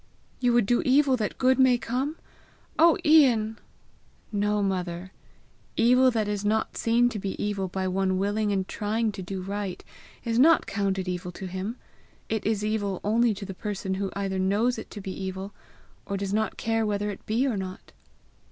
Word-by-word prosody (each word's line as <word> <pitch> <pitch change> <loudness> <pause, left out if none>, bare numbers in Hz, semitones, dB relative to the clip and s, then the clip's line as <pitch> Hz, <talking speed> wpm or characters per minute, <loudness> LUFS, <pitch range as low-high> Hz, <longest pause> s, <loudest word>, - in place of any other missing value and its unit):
"You 245 -1 +2
would 240 -3 +4
do 240 +4 +2
evil 270 0 +4
that 210 -4 -3
good 260 +1 +3
may 260 -2 +5
come! 255 +6 -2 0.6
Oh, 335 +2 +6
Ian!" 245 -8 +5 0.7
"No, 210 0 +1
mother; 180 -1 -3 0.7
evil 250 +3 +5
that 225 -4 0
is 205 -1 -2
not 215 +1 0
seen 235 +1 +3
to 220 - -5
be 195 0 -4
evil 200 -2 -1
by 190 +1 -2
one 185 0 0
willing 205 +2 0
and 190 -2 -1
trying 220 +1 -1
to 195 - -7
do 185 0 -5
right, 200 -1 -4 0.4
is 230 0 0
not 325 +5 +6
counted 195 -2 -1
evil 180 0 -3
to 190 - -7
him. 190 +5 -4 0.5
It 220 -2 -1
is 210 -1 0
evil 205 -3 -1
only 225 +1 +2
to 200 - -7
the 195 - -6
person 195 -1 -4
who 195 0 -2
either 195 -1 -2
knows 205 +6 +1
it - - -9
to 205 - -8
be 190 - -5
evil, 190 +1 -5 0.5
or 200 - -2
does 195 0 -3
not 220 +1 0
care 225 0 0
whether 210 -1 -1
it 195 - -10
be 230 +5 +1
or 255 -5 0
not." 190 -1 -6
205 Hz, 185 wpm, -26 LUFS, 195-230 Hz, 0.7 s, Oh